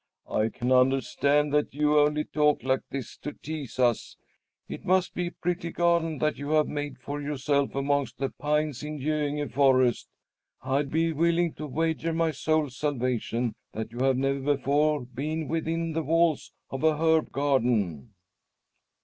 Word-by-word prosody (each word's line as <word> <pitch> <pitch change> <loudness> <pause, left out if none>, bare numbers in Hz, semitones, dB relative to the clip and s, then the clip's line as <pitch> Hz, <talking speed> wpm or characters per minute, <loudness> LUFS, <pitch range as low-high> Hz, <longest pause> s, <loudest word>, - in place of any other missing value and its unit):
"I 110 +1 +1
can 125 +3 -3
understand 135 +3 +3
that 150 -2 +1
you 150 0 +3
only 150 +1 +2
talk 150 -4 +1
like 130 0 +1
this 135 -4 -6
to 150 - -6
tease 150 -5 -7
us. 120 -3 +1 0.5
It - - -7
must 185 0 +2
be 180 -1 -2
a - - -5
pretty 175 -1 -3
garden 170 -2 +1
that 155 +2 0
you 145 0 -5
have 155 -1 +3
made 145 -1 -4
for 145 +1 -5
yourself 140 -1 0
amongst 140 0 0
the 135 -1 -1
pines 150 -2 -1
in 150 0 -5
Göinge 145 -2 -1
forest! 130 -3 +3 0.5
I'd 135 +2 0
be 165 +2 +1
willing 170 +1 +2
to 155 - -6
wager 160 +3 -1
my 165 0 +1
soul's 150 -1 0
salvation 125 -4 -1 0.2
that 110 0 -5
you 120 - -8
have 130 0 +2
never 135 +1 +1
before 145 0 +1
been 150 +6 -4
within 165 +1 -2
the 165 - 0
walls 165 0 +1 0.2
of 135 +2 -4
an 155 -1 +3
herb 160 0 +2
garden." 115 - 0
145 Hz, 160 wpm, -27 LUFS, 135-155 Hz, 0.5 s, understand